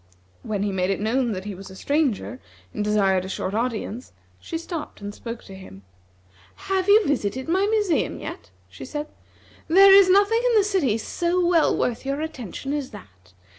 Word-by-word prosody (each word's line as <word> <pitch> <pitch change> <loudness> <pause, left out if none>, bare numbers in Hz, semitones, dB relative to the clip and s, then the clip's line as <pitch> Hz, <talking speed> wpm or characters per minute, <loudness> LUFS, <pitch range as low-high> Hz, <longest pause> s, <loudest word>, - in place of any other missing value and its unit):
When 205 -2 -3
he 205 - -1
made 185 -1 -1
it 195 - -1
known 235 +3 0
that 185 0 -6
he 205 - -5
was 195 +1 -10
a 190 - -11
stranger, 270 -1 -1 0.3
and 210 - -2
desired 195 -3 +2
a 190 - -7
short 190 0 -3
audience, 230 +1 -3 0.3
she 330 - -5
stopped 335 -1 -7
and 205 0 -7
spoke 230 +2 -8
to 195 - -12
him. 185 - -12 0.9
"Have 380 0 +1
you 420 +1 +6
visited 260 -2 -1
my 380 +4 +2
museum 420 -5 0
yet?" - - -8 0.2
she - - -11
said. 300 0 -5 0.6
"There 385 +4 +7
is 390 -1 +7
nothing 405 +4 +4
in 485 -3 +3
the 415 - +5
city 365 - +1
so 345 +10 -1
well 345 -2 +3
worth 240 -2 -1
your 275 +1 -2
attention 275 - -5
as 290 -3 -3
that. 90 - -15
260 Hz, 185 wpm, -23 LUFS, -, 0.9 s, There